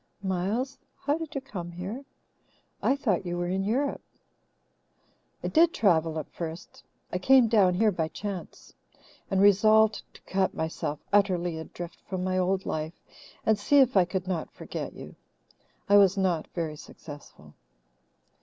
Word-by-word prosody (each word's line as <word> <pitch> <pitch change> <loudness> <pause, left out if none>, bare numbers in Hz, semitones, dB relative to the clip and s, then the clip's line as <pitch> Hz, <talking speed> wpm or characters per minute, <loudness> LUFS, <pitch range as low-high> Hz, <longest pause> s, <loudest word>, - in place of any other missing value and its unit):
"Miles, 200 +9 -2 0.2
how 285 +1 0
did 320 -1 -6
you 275 - -1
come 175 -9 -7
here? 195 +10 -6 0.8
I 270 - +3
thought 215 -11 0
you 175 -1 -3
were 175 - -1
in 190 +2 -1
Europe." 260 +8 0 1.4
"I - - -1
did 335 +2 +4
travel 165 -6 +2
at 155 - -5
first. 165 0 -7 0.3
I 180 - 0
came 255 +4 +6
down 200 -5 +4
here 215 +3 +3
by 165 -4 -1
chance, 195 +2 -7 0.6
and 190 - +1
resolved 215 +2 +5
to - - -15
cut 190 0 0
myself 160 -2 -3 0.2
utterly 180 -5 +2
adrift 170 +1 -8
from 185 -1 -2
my 185 0 0
old 190 +1 0
life 155 +2 -4 0.5
and 220 -1 +3
see 285 +8 +3
if 260 -4 +5
I 185 -2 +6
could 185 +1 -3
not 175 -4 -2
forget - - -6
you. - - -10 0.7
I 205 - +6
was 195 -1 +5
not 180 -5 0
very 160 -3 -3
successful." 145 0 -12
190 Hz, 155 wpm, -27 LUFS, 175-220 Hz, 1.4 s, came